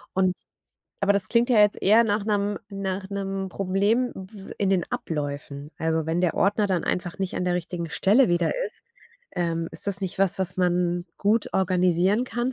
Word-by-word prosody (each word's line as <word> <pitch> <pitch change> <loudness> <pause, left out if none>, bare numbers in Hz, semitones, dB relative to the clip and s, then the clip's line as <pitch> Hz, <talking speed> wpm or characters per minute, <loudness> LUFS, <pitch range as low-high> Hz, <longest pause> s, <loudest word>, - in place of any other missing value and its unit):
Und 185 -1 +2 0.6
aber 200 0 +3
das 200 -2 +1
klingt 235 +1 +2
ja 235 - +5
jetzt 210 0 +3
eher 220 +4 +6
nach 205 -1 0
'nem 205 -1 0
nach 195 -1 -4
'nem 195 -1 -3
Problem 200 +7 +1
w 195 +1 -10
in 195 -2 +1
den 185 -3 +2
Abläufen. 145 -1 -4
Also, 160 -1 0
wenn 165 +2 0
der 180 -2 +1
Ordner 205 +1 +2
dann 185 -4 0
einfach 180 0 -2
nicht 190 -1 -3
an - - -1
der 180 -1 +1
richtigen 170 -1 -4
Stelle 210 +7 +4
wieder 175 -1 +1
ist, - - -10 0.5
ähm, 165 -2 -1
ist - - -4
das 200 0 0
nicht 190 -1 -4
was, 195 -2 +1
was 185 0 -2
man 175 -1 +1
gut 210 +2 +1
organisieren 185 +3 +2
kann, 245 +1 -2
190 Hz, 185 wpm, -25 LUFS, 175-205 Hz, 0.6 s, eher